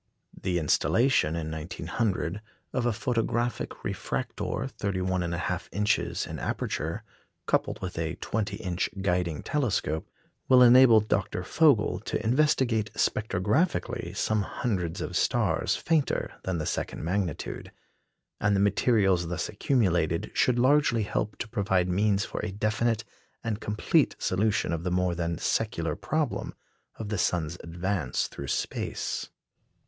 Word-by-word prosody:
The 90 -2 -1
installation, 85 - +2
in 80 -2 -3
1900, 90 +4 -2 0.3
of 125 -2 +1
a - - +3
photographic 120 0 -1
refractor - - -3
31 95 -2 -2
1/2 85 +1 -2
inches 105 +1 0
in - - -6
aperture, - - -3 0.4
coupled - - 0
with 90 -2 -4
a 80 0 -2
20 105 0 -2
inch 90 -4 -2
guiding 90 -4 0
telescope, 110 - -1 0.4
will 125 -1 +8
enable 120 -2 +8
Dr. 110 - -1
Vogel - - +3
to 110 - -3
investigate 120 -4 +2
spectrographically 115 - 0
some 110 -1 +1
hundreds 95 -5 -2
of - - -4
stars - - +1
fainter 160 -4 0
than 95 -2 -1
the 80 - -2
second - - -3
magnitude; 90 -1 -3 0.7
and 105 -1 +2
the - - +2
materials 100 -3 +3
thus 85 0 -3
accumulated 85 - +1
should 125 -1 +3
largely 130 -3 +4
help 105 +1 -2
to - - -4
provide 95 -5 +1
means 100 +2 +2
for - - -5
a 105 - -2
definite 110 +2 0 0.4
and 110 -2 -2
complete 105 0 +2
solution 100 -2 +1
of 80 - -2
the 90 - -1
more 90 0 +1
than 85 -1 -2
secular - - -1
problem - - -2 0.4
of 110 -2 -6
the 105 -3 -1
sun's 85 -1 0
advance 85 -4 -1
through 70 - -7
space. - - -2
100 Hz, 130 wpm, -28 LUFS, 90-115 Hz, 0.7 s, will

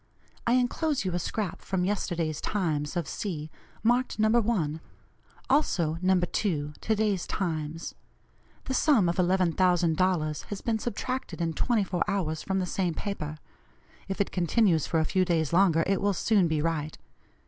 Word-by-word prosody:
I 235 - +4
enclose 255 +1 +1
you 185 - -1
a 175 - 0
scrap 195 +1 -3
from 185 -2 -1
yesterday's 175 -6 -1
Times 160 -5 -1
of 170 -4 -2
C., 155 -6 -4 0.3
marked 245 +3 +2
No. 215 0 +3
1; 205 -10 +1 0.7
also 170 - +1
No. 185 0 +3
2, 165 -4 -1
to 220 - +1
day's 205 -4 0
Times. 165 -3 -3 0.7
The 265 - -3
sum 260 - +4
of 170 - 0
$11,000 180 -3 +2
has 205 - -6
been 225 -2 0
subtracted 255 +1 -4
in 165 -1 -1
twenty 230 +4 +1
four 180 -2 -1
hours 160 -6 -1
from 190 -1 -2
the 185 - 0
same 180 -2 -1
paper. 155 -7 -4 0.7
If 195 - -4
it 200 - 0
continues 175 - +2
for 165 - +1
a 160 - +1
few 185 +3 +2
days 165 -4 0
longer, 170 -3 +4
it 195 -1 +1
will 205 0 +2
soon 195 -1 +2
be 155 -2 0
right. 155 -2 -2
180 Hz, 160 wpm, -28 LUFS, 160-205 Hz, 0.7 s, I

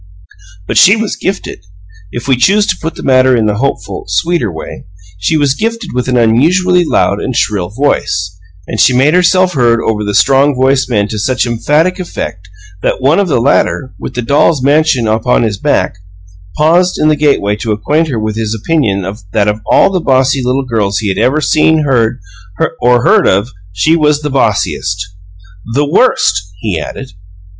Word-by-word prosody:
But - - +1
she 200 - +6
was 220 -1 -3
gifted 195 +1 -4 0.5
if 120 - -6
we 135 - +3
choose 200 +12 +2
to - - 0
put 165 +1 -4
the - - -9
matter 130 -1 +3
in 110 - +1
the 105 -1 -1
hopeful, 115 -7 -3
sweeter 110 - -1
way 80 -5 -9 0.3
she 95 +12 0
was 145 -3 +1
gifted 230 - -4
with 125 0 -2
an 125 -1 0
unusually 175 +11 +2
loud 105 -10 0
and 130 - -4
shrill 100 -6 -1
voice, 90 -7 -2 0.3
and - - -5
she 125 - +4
made 140 +4 +3
herself 180 +1 +3
heard 120 -3 +2
over 110 -2 -2
the 105 -1 -3
strong 135 +7 +3
voiced 130 +1 +1
men 105 -4 0
to 110 - -4
such 130 +5 0
emphatic 150 +10 0
effect 95 - -6 0.3
that - - -1
one 140 +7 +2
of 200 - +1
the 150 - +1
latter, 130 +1 0
with - - -7
the 120 - -2
dolls' 140 +2 +2
mansion 140 -4 +2
upon 110 +3 +1
his 105 -4 -2
back, 95 - -1 0.6
paused 170 +4 +2
in 155 - +1
the 155 - +3
gateway 140 -9 +1
to 110 0 -4
acquaint 150 +10 0
her 130 -6 -3
with 110 -1 -3
his 110 -1 -3
opinion 105 - -1 0.3
that 105 -2 +1
of 105 +1 -1
all 195 - +4
the 185 -2 -1
bossy 135 -1 +1
little 130 +2 -1
girls 105 -5 -1
he 105 0 -2
had 95 - -2
ever 140 +4 +1
seen, 155 +1 +2
heard, 120 -4 +1 0.6
or 120 0 +3
heard - - +4
of, 100 +6 +1 0.2
she 95 - +1
was 150 -2 +1
the 150 - -3
bossiest. 95 - -1 0.8
"THE 145 +1 +2
worst!" 145 - +2 0.2
he 95 -5 -3
added. 130 - -8
130 Hz, 185 wpm, -12 LUFS, 110-150 Hz, 0.8 s, she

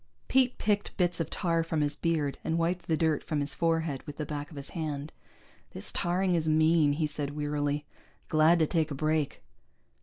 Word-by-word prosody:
Pete 260 -1 +3
picked 205 -1 0
bits 175 -2 +1
of 165 - -1
tar 165 -2 +1
from 160 -2 -1
his 145 0 +1
beard, 155 -4 -1
and 165 - 0
wiped 175 +2 -1
the 160 - +2
dirt 160 -2 +1
from 155 - -2
his 145 0 -1
forehead 165 -4 0
with 145 - -7
the 150 - -3
back 145 -1 -5
of 155 - -12
his 140 0 -6
hand. 150 -2 -4 0.6
"This 95 - -7
tarring 180 +1 +1
is 160 -2 +1
mean," 155 -1 +4
he 155 +2 0
said 145 -1 -4
wearily. 145 0 -1 0.4
"Glad 155 +2 +5
to 160 - +3
take 160 0 0
a 145 - -4
break." 155 0 -1
155 Hz, 200 wpm, -29 LUFS, 145-165 Hz, 0.6 s, Glad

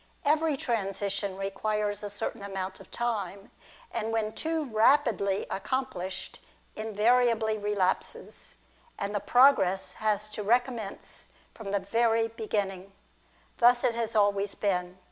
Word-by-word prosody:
Every 305 0 +2
transition 200 -4 -2
requires 205 +1 -2
a 205 - -4
certain 205 +2 -4
amount 195 -1 -5
of 195 - -14
time, 205 -4 -3 0.4
and 225 -1 -2
when 220 -1 -1
too 320 -1 -1
rapidly 220 -4 +3
accom 260 +6 -1
plished, 185 +1 -6 0.4
invariably 220 0 +2
relapses, 205 -3 -2 0.4
and 200 +1 -3
the 205 - 0
progress 200 -6 +4
has 215 -1 0
to 215 0 -6
recommence 235 -1 -1 0.2
from 220 -3 -8
the 200 - +1
very 225 +3 +2
beginning. 200 -4 -3 0.7
Thus 245 0 +5
it 250 -2 +3
has 230 -1 -3
always 205 -1 +2
been. 180 -3 -1
215 Hz, 125 wpm, -29 LUFS, 195-235 Hz, 0.7 s, Thus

